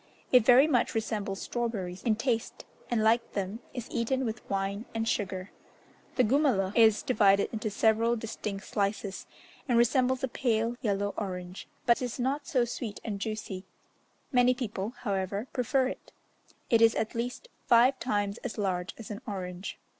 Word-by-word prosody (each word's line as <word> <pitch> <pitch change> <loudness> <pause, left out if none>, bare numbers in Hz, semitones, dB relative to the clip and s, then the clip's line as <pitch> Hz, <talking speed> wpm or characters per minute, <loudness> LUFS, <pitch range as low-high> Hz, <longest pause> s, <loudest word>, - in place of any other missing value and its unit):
It 250 -3 +7
very 250 +4 +7
much 260 -7 +1
resembles 210 -3 -2
strawberries 205 -7 -3
in 225 -3 +2
taste, 230 0 -2 0.2
and, 230 -3 +1
like 230 +2 +2
them, 200 +2 -3
is 245 -2 -6
eaten 260 +3 0
with 225 0 -3
wine 195 +2 -2
and 225 0 -1
sugar. 190 -3 -2 0.6
The 255 - +4
gumaloh 230 -6 +2
is 220 -2 +5
divided 200 -5 +4
into 215 0 -2
several 225 +3 +2
distinct 210 -3 -5
slices, 200 -1 -2 0.4
and 240 - +4
resembles 255 +2 +3
a - - +2
pale 235 -2 0
yellow 205 -3 0
orange, 180 -2 -5 0.2
but 235 +1 +4
is 245 -2 -3
not 275 +3 -1
so 250 -4 +2
sweet 235 -3 -5
and 205 -3 -4
juicy; 205 -3 -4 0.7
many 250 -1 +4
people, 225 -2 -4
however, 200 0 -2
prefer 260 +1 +1
it; - - -9 0.6
it 230 -1 +5
is 225 0 +6
at 220 - -1
least 245 - -4 0.2
five 250 +3 +5
times 205 -3 -1
as 250 - -6
large 185 -3 -2
as 225 -2 -8
an 210 +3 -6
orange. 185 -2 -5
225 Hz, 160 wpm, -29 LUFS, 200-245 Hz, 0.7 s, It